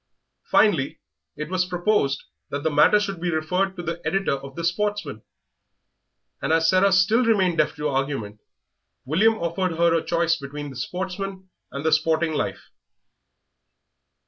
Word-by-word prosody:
Finally, 145 -11 +3 0.4
it 150 - -5
was 185 +1 0
proposed 175 -6 0 0.3
that 145 0 -4
the 160 - +1
matter 150 +8 +5
should 195 -5 -4
be 175 - -1
referred 180 +4 0
to 175 - -6
the 170 +1 -4
editor 195 -4 0
of 140 0 -7
the 170 - -5
Sportsman; 205 - -2 1.2
and 140 - -1
as 165 0 +3
Sarah 185 +3 +4
still 195 +7 +4
remained 190 -7 +2
deaf 155 - +2
to 150 0 -2
argument, 135 -7 -2 0.7
William 200 +11 +3
offered 180 -1 -2
her 165 -1 +3
choice 170 0 +1
between 145 0 -7
the - - -11
Sportsman 190 +6 -5 0.2
and 140 +2 -6
the 160 - +3
Sporting 160 +1 +2
Life. - - -4
170 Hz, 145 wpm, -24 LUFS, 150-190 Hz, 1.2 s, matter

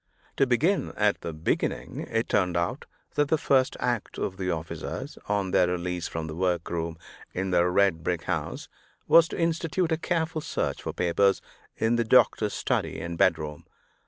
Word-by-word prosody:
To 135 - +4
begin 155 +11 +1
at 105 -1 +2
the 85 - -4
beginning, 80 +1 -2
it 115 +1 0
turned 90 -3 +1
out 85 +11 -2 0.3
that 145 0 +2
the 160 - +2
first 135 -3 +2
act 120 -3 -2
of 95 - -3
the 95 -2 -2
officers, 80 -2 -5
on 100 -2 0
their 90 - +4
release 90 -1 -2
from 80 -1 -4
the 80 - -6
workroom 85 -1 -1 0.4
in 95 +1 -1
the 90 0 +4
red 90 -3 +2
brick 85 -1 -1
house, - - -3 0.4
was 165 0 +7
to - - -6
institute 165 +1 0
a 160 - +2
careful 160 -1 -1
search - - -2
for - - -4
papers 95 +3 +2 0.4
in 115 +1 +2
the 115 - +2
doctor's 110 -3 +3
study - - -1
and 85 0 -4
bedroom. 75 -2 +1
95 Hz, 170 wpm, -27 LUFS, 85-130 Hz, 0.4 s, was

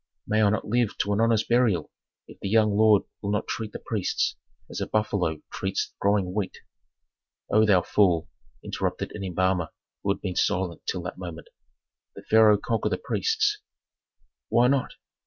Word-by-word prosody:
May 110 +1 +1
I 105 - +5
not 110 - -1
live 115 -1 0
to 100 - 0
an 105 - +1
honest 115 -1 +2
burial 115 -9 +2 0.4
if - - -14
the 100 - -4
young 105 -1 +3
lord 110 -1 +5 0.2
will 100 - -3
not 105 +1 0
treat 110 -2 -4
the - - -6
priests 105 -5 -1 0.3
as - - -6
a - - -2
buffalo 100 -7 -1
treats - - -2
growing 100 -2 +1
wheat." 100 -2 -3 0.9
"O 110 0 +4
thou 95 -4 +4
fool!" 90 -6 +2 0.4
interrupted - - -3
an 105 - -6
embalmer 95 -2 0 0.3
who 100 - -3
had 95 - -12
been 95 -3 -4
silent 90 -3 0
till 90 - -2
that 90 +1 -6
moment. 85 -3 -8 0.7
"The - - -10
pharaoh 110 -1 +5
conquer 115 +2 -1
the - - -1
priests!" 435 -2 0 0.9
"Why 120 +2 +4
not?" 135 0 0
105 Hz, 170 wpm, -26 LUFS, 95-110 Hz, 0.9 s, I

